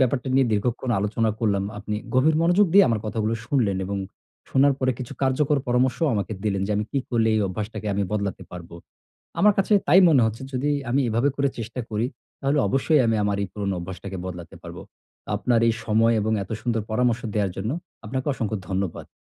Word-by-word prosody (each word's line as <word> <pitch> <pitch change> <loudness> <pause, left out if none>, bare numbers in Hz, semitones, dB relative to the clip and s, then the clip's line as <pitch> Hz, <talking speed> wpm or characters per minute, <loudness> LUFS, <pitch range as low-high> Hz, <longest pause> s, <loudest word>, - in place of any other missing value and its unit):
ব্যাপারটা 130 +1 +1
নিয়ে 135 -1 +4
দীর্ঘক্ষণ 120 +4 -1
আলোচনা 110 +2 0
করলাম। 100 -4 +1
আপনি 105 +1 -4 0.2
গভীর 150 +5 +4
মনোযোগ 175 +5 +4
দিয়ে 200 - +9
আমার 115 -3 0
কথাগুলো 110 +1 -1
শুনলেন 115 -8 +1
এবং 100 +2 -3 0.5
শোনার 140 +1 +4
পরে 130 -1 +1
কিছু 125 - -6
কার্যকর 140 +2 +2
পরামর্শও 125 +6 +2
আমাকে 100 0 -2
দিলেন 100 -2 0
যে - - -4
আমি 105 - 0
কি 140 - +1
করলে 115 -2 +2
এই 110 - +2
অভ্যাসটাকে 105 +3 -5
আমি 100 - 0
বদলাতে 100 -2 -2
পারবো। 85 -1 -9 0.7
আমার 210 0 +6
কাছে 195 +2 +2
তাই 180 +6 +7
মনে 140 -6 +5
হচ্ছে 110 +2 -3
যদি 130 +3 0 0.2
আমি 135 +3 +2
এভাবে 120 +6 +2
করে 140 0 +1
চেষ্টা 115 +2 -5
করি, 110 +1 -1 0.3
তাহলে 140 +1 +1
অবশ্যই 135 +2 +3
আমি 115 - +2
আমার 100 -1 0
এই 100 - -3
পুরোনো 100 -2 -2
অভ্যাসটাকে 95 +2 -7
বদলাতে 90 -2 -8
পারবো। - - -8 0.5
আপনার 120 -2 +2
এই 115 - +3
সময় 115 +2 +3
এবং 110 +2 0
এত 95 - -12
সুন্দর 115 -2 0
পরামর্শ 120 +1 +1
দেওয়ার 100 -3 0
জন্য 105 +5 -2 0.3
আপনাকে 130 +5 -3
অসংখ্য 110 -4 -2
ধন্যবাদ। 95 -2 -3
115 Hz, 190 wpm, -24 LUFS, 105-130 Hz, 0.7 s, দিয়ে